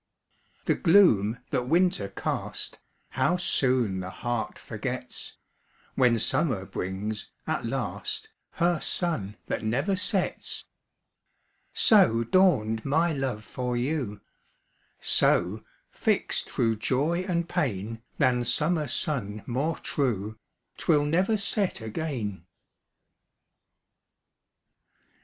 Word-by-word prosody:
The -, -, +3 dB
gloom 125 Hz, -, +4 dB
that 125 Hz, 0 st, 0 dB
winter 170 Hz, -, +2 dB
cast, 100 Hz, -, -4 dB, 0.3 s
How 180 Hz, -, +1 dB
soon 125 Hz, -, +1 dB
the 95 Hz, 0 st, -5 dB
heart 120 Hz, +4 st, -3 dB
forgets, -, -, -6 dB, 0.6 s
When 125 Hz, -3 st, +3 dB
summer 110 Hz, -, +1 dB
brings, 95 Hz, +4 st, -4 dB, 0.2 s
at -, -, -2 dB
last, -, -, -4 dB, 0.2 s
Her 170 Hz, -1 st, +1 dB
sun 115 Hz, -, 0 dB
that -, -, -3 dB
never 135 Hz, -, 0 dB
sets! 190 Hz, 0 st, -1 dB, 1.1 s
So 180 Hz, -, +5 dB
dawned 115 Hz, -, +3 dB
my 160 Hz, +4 st, +2 dB
love 130 Hz, -6 st, -3 dB
for 125 Hz, +2 st, -3 dB
you; 125 Hz, -6 st, -2 dB, 0.8 s
So, 95 Hz, +5 st, +3 dB, 0.3 s
fixt -, -, 0 dB
thro' 115 Hz, -1 st, +1 dB
joy 135 Hz, +10 st, 0 dB
and 175 Hz, -2 st, -1 dB
pain, 115 Hz, -, -2 dB, 0.2 s
Than 125 Hz, -1 st, +2 dB
summer 150 Hz, +6 st, +1 dB
sun 110 Hz, -7 st, 0 dB
more 140 Hz, +7 st, -1 dB
true, 110 Hz, -6 st, -2 dB, 0.4 s
'Twill 145 Hz, -1 st, +3 dB
never 185 Hz, +8 st, +2 dB
set 200 Hz, -, 0 dB
again. 110 Hz, -, -4 dB
125 Hz, 95 wpm, -27 LUFS, 110-170 Hz, 1.1 s, So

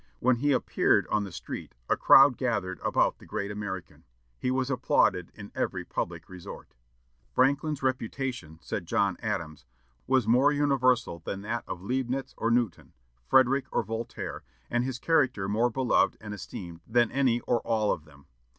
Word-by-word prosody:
When 125 Hz, 0 st, +3 dB
he 145 Hz, +4 st, +1 dB
appeared 130 Hz, -, +2 dB
on 105 Hz, -1 st, +1 dB
the 100 Hz, -, -8 dB
street -, -, -7 dB
a -, -, +3 dB
crowd 135 Hz, -1 st, +7 dB
gathered 100 Hz, -, -2 dB
about -, -, +1 dB
the -, -, -15 dB
great 100 Hz, +1 st, -3 dB
American. 100 Hz, -4 st, -6 dB, 0.4 s
He -, -, -1 dB
was 130 Hz, +1 st, 0 dB
applauded 125 Hz, -2 st, +2 dB
in -, -, -10 dB
every -, -, -2 dB
public 85 Hz, -1 st, -4 dB
resort. 90 Hz, -2 st, -10 dB, 0.6 s
"Franklin's 140 Hz, +2 st, +2 dB
reputation," 130 Hz, -, -3 dB
said -, -, -4 dB
John -, -, +1 dB
Adams, 75 Hz, -3 st, -3 dB, 0.4 s
"was 130 Hz, -3 st, +2 dB
more 130 Hz, +5 st, +5 dB
universal 130 Hz, -10 st, +2 dB
than 95 Hz, +4 st, -5 dB
that 115 Hz, +3 st, -3 dB
of 90 Hz, -, -6 dB
Leibnitz 130 Hz, +3 st, -2 dB
or 115 Hz, -, +1 dB
Newton, 115 Hz, -5 st, 0 dB, 0.3 s
Frederick 130 Hz, +1 st, +4 dB
or -, -, +1 dB
Voltaire; 115 Hz, +2 st, -5 dB, 0.3 s
and 120 Hz, 0 st, +1 dB
his 130 Hz, -1 st, -3 dB
character 130 Hz, -10 st, +1 dB
more 110 Hz, +4 st, +2 dB
beloved 125 Hz, +1 st, +2 dB
and 105 Hz, -1 st, -7 dB
esteemed 90 Hz, -3 st, -8 dB
than 120 Hz, 0 st, +3 dB
any 130 Hz, -4 st, +2 dB
or 120 Hz, -, +1 dB
all 110 Hz, -2 st, +1 dB
of 80 Hz, -, -3 dB
them. 70 Hz, -2 st, -19 dB
120 Hz, 160 wpm, -28 LUFS, 100-130 Hz, 0.6 s, crowd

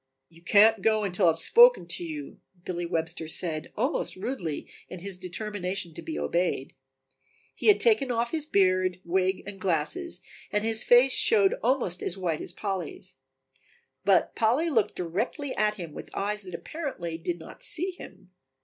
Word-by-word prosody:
"You 165 Hz, 0 st, -19 dB
can't 210 Hz, +4 st, +5 dB
go 215 Hz, +1 st, +2 dB
until 180 Hz, -3 st, +1 dB
I -, -, +8 dB
have 165 Hz, -, +1 dB
spoken -, -, +6 dB
to 355 Hz, -, -3 dB
you," 310 Hz, -3 st, -7 dB, 0.3 s
Billy 175 Hz, -1 st, -3 dB
Webster 165 Hz, -1 st, -2 dB
said 160 Hz, -1 st, -3 dB
almost 255 Hz, +8 st, -1 dB
rudely 185 Hz, -, -4 dB, 0.2 s
in 185 Hz, -, -7 dB
his 195 Hz, +2 st, -3 dB
determination 185 Hz, -1 st, -4 dB
to -, -, -8 dB
be 320 Hz, -, -5 dB
obeyed. 170 Hz, -6 st, -1 dB, 0.8 s
He -, -, -4 dB
had 420 Hz, -, +7 dB
taken 425 Hz, -, +3 dB
off 235 Hz, 0 st, 0 dB
his 310 Hz, -2 st, -2 dB
beard, 185 Hz, -, +2 dB
wig 185 Hz, +2 st, 0 dB
and 195 Hz, -1 st, -9 dB
glasses 195 Hz, -, -1 dB, 0.3 s
and 210 Hz, 0 st, 0 dB
his 225 Hz, 0 st, +2 dB
face 245 Hz, +2 st, +6 dB
showed 200 Hz, -3 st, +5 dB
almost 235 Hz, -8 st, 0 dB
as 180 Hz, -, 0 dB
white 170 Hz, -5 st, -2 dB
as -, -, -7 dB
Polly's. 200 Hz, -, -5 dB, 0.9 s
But -, -, +3 dB
Polly 255 Hz, +9 st, +2 dB
looked 225 Hz, -7 st, +1 dB
directly 220 Hz, -, -3 dB
at 210 Hz, 0 st, +1 dB
him 170 Hz, -6 st, -8 dB
with -, -, -9 dB
eyes 210 Hz, +1 st, -1 dB
that 185 Hz, -3 st, -8 dB
apparently 175 Hz, -, -5 dB
did 175 Hz, +1 st, -3 dB
not 160 Hz, -, -12 dB
see 360 Hz, +3 st, -2 dB
him. 185 Hz, -, -13 dB
195 Hz, 165 wpm, -27 LUFS, 175-245 Hz, 0.9 s, I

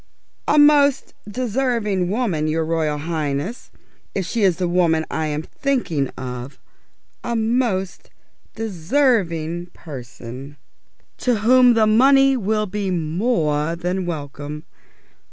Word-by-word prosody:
"A 300 Hz, -, +3 dB
most 285 Hz, -2 st, +4 dB, 0.2 s
deserving 225 Hz, -5 st, -1 dB
woman, 195 Hz, -9 st, 0 dB
your 160 Hz, +1 st, 0 dB
Royal 160 Hz, -2 st, 0 dB
Highness. 155 Hz, -, -3 dB, 0.5 s
If 190 Hz, -, -1 dB
she 225 Hz, +7 st, -2 dB
is 190 Hz, -4 st, +3 dB
the 180 Hz, -1 st, -1 dB
woman 170 Hz, -3 st, +2 dB
I'm 155 Hz, -1 st, -2 dB
thinking 240 Hz, -, -1 dB
of, 125 Hz, +1 st, -6 dB, 0.7 s
a 235 Hz, -, -2 dB
most 225 Hz, -4 st, -1 dB, 0.5 s
deserving 180 Hz, -, 0 dB
person, 130 Hz, -1 st, -9 dB, 0.6 s
to 245 Hz, -, +1 dB
whom 250 Hz, +1 st, +6 dB
the 220 Hz, -1 st, +4 dB
money 270 Hz, +5 st, +5 dB
will 215 Hz, -2 st, 0 dB
be 200 Hz, 0 st, -3 dB
more 165 Hz, -3 st, 0 dB
than 180 Hz, +1 st, -2 dB
welcome. 150 Hz, -1 st, -6 dB
180 Hz, 110 wpm, -21 LUFS, 155-235 Hz, 0.7 s, whom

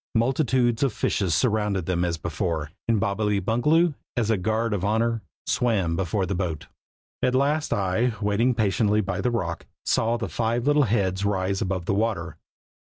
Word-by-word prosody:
Multitudes 120 Hz, -1 st, +2 dB
of 135 Hz, -5 st, +2 dB
fishes 95 Hz, -6 st, 0 dB
surrounded 105 Hz, -6 st, +1 dB
them 90 Hz, -1 st, 0 dB
as 85 Hz, -1 st, -1 dB
before, 80 Hz, -2 st, -3 dB, 0.2 s
and 115 Hz, -2 st, +2 dB
Bobbily 100 Hz, +1 st, 0 dB
Bungaloo, 150 Hz, -, +2 dB, 0.2 s
as 115 Hz, -2 st, +1 dB
a 110 Hz, -, +2 dB
guard 110 Hz, +4 st, 0 dB
of 95 Hz, -3 st, -2 dB
honor, 115 Hz, +2 st, +1 dB, 0.2 s
swam 100 Hz, -9 st, +1 dB
before 95 Hz, +2 st, -1 dB
the 100 Hz, -, -2 dB
boat. 85 Hz, -5 st, -3 dB, 0.6 s
At 125 Hz, -, +2 dB
last 145 Hz, +3 st, +1 dB
I, 100 Hz, +5 st, +1 dB
waiting 110 Hz, +4 st, +1 dB
patiently 105 Hz, 0 st, +2 dB
by 95 Hz, -2 st, -3 dB
the 125 Hz, -, +1 dB
rock, 90 Hz, -9 st, -3 dB, 0.2 s
saw 115 Hz, +1 st, +1 dB
the 115 Hz, -, -3 dB
five 120 Hz, +1 st, -1 dB
little 145 Hz, -1 st, +4 dB
heads 95 Hz, -3 st, 0 dB
rise 95 Hz, -1 st, 0 dB
above 95 Hz, -4 st, -2 dB
the -, -, 0 dB
water. 95 Hz, -7 st, -1 dB
105 Hz, 170 wpm, -25 LUFS, 95-115 Hz, 0.6 s, little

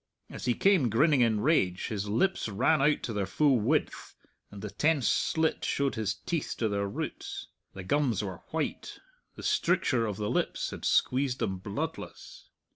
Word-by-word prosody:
As -, -, -7 dB
he 120 Hz, -2 st, +2 dB
came 185 Hz, -11 st, +3 dB
grinning 140 Hz, +5 st, +3 dB
in 110 Hz, -3 st, +2 dB
rage 95 Hz, -, +1 dB
his 105 Hz, -1 st, -3 dB
lips 155 Hz, -, +1 dB
ran 130 Hz, +9 st, +2 dB
out 150 Hz, +2 st, +2 dB
to 115 Hz, -, -3 dB
their 100 Hz, -2 st, -1 dB
full 140 Hz, +3 st, +3 dB
width, 140 Hz, +9 st, -1 dB, 0.3 s
and 100 Hz, 0 st, -10 dB
the 105 Hz, -, -5 dB
tense 150 Hz, -4 st, +1 dB
slit 160 Hz, 0 st, +1 dB
showed 140 Hz, -1 st, 0 dB
his 110 Hz, -3 st, -2 dB
teeth 165 Hz, +6 st, -3 dB
to 115 Hz, -, 0 dB
their 100 Hz, -1 st, -1 dB
roots. 100 Hz, -, -5 dB, 0.3 s
The 95 Hz, -, -7 dB
gums 120 Hz, -2 st, +1 dB
were 95 Hz, -4 st, -6 dB
white. -, -, -3 dB, 0.4 s
The -, -, -10 dB
stricture 115 Hz, -3 st, +1 dB
of 105 Hz, -2 st, -4 dB
the 105 Hz, 0 st, -2 dB
lips -, -, -1 dB
had -, -, -7 dB
squeezed 130 Hz, 0 st, +2 dB
them 95 Hz, -6 st, -2 dB
bloodless. 100 Hz, +2 st, -6 dB
115 Hz, 175 wpm, -29 LUFS, 105-145 Hz, 0.4 s, came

